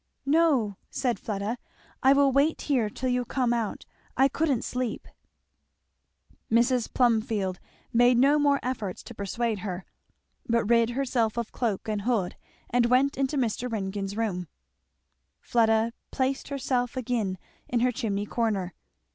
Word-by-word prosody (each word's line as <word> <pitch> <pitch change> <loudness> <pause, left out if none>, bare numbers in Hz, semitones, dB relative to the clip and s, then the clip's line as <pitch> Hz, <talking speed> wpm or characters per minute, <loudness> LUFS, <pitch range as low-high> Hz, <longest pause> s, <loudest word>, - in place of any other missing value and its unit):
"No," 275 - +3
said 245 -3 -1
Fleda, 210 +3 -3 0.4
"I 265 - +6
will 280 -1 +4
wait 280 +4 +2
here 250 -7 +1
till 255 +4 -3
you 250 0 +1
come 245 0 0
out. 230 -3 -2 0.3
I 270 +1 +5
couldn't 280 -4 0
sleep." 250 -2 -3 1.4
Mrs. 240 +1 +2
Plumfield 220 -6 +1 0.3
made 245 +1 +5
no 280 +4 +5
more 285 -1 +3
efforts 225 -7 -3
to 240 - -10
persuade 220 +1 -2
her, 185 -1 -5 0.6
but 230 -1 +2
rid 230 +1 +4
herself 240 -3 0
of 235 -2 -2
cloak 225 -5 -2
and 210 -1 -1
hood 215 -5 0 0.4
and 240 0 +3
went 260 +3 +3
into 275 +2 0
Mr. 245 -1 -1
Ringgan's 200 -1 -3
room. 185 -6 -2 0.9
Fleda 225 -1 +2 0.2
placed 265 0 -1
herself 260 -2 -1
again 225 -6 -1 0.3
in 240 -1 +1
her 250 +1 +3
chimney 210 -5 -2
corner. 205 -6 -1
235 Hz, 140 wpm, -27 LUFS, 215-260 Hz, 1.4 s, I